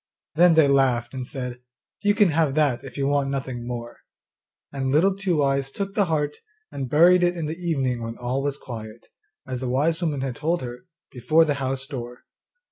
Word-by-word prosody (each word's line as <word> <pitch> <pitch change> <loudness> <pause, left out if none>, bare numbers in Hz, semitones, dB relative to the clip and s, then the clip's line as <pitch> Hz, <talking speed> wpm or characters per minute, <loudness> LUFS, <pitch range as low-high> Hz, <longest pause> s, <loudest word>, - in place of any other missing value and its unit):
Then 170 +1 +5
they 160 -3 +6
laughed 130 -3 +2
and 130 -2 -5
said, 125 -2 -5 0.4
'You 205 0 +2
can 205 -4 +4
have 155 -3 +1
that 145 -6 +1
if 135 0 -10
you 140 - 0
want 140 -1 +1
nothing 130 -3 -4
more.' 120 -1 -6 0.7
And 135 -1 -2
Little 185 +7 +3
Two 180 -6 0
eyes 135 -1 0
took 195 +3 -4
the 205 -2 +2
heart 150 -3 -1 0.3
and 135 -2 -5
buried 175 +5 +6
it 175 0 +2
in 165 - -2
the 155 +2 -4
evening 135 -8 -1
when 115 0 -5
all 125 +2 -2
was 140 0 -2
quiet, 115 -3 -9 0.4
as 130 -1 -5
the 130 - -2
wise 155 +7 +1
woman 150 -5 -1
had 135 -2 -3
told 165 +1 -1
her, 125 +8 -8 0.2
before 155 +6 +3
the 150 - +1
house 135 0 -2
door. 125 -4 -7
140 Hz, 200 wpm, -24 LUFS, 125-160 Hz, 0.7 s, they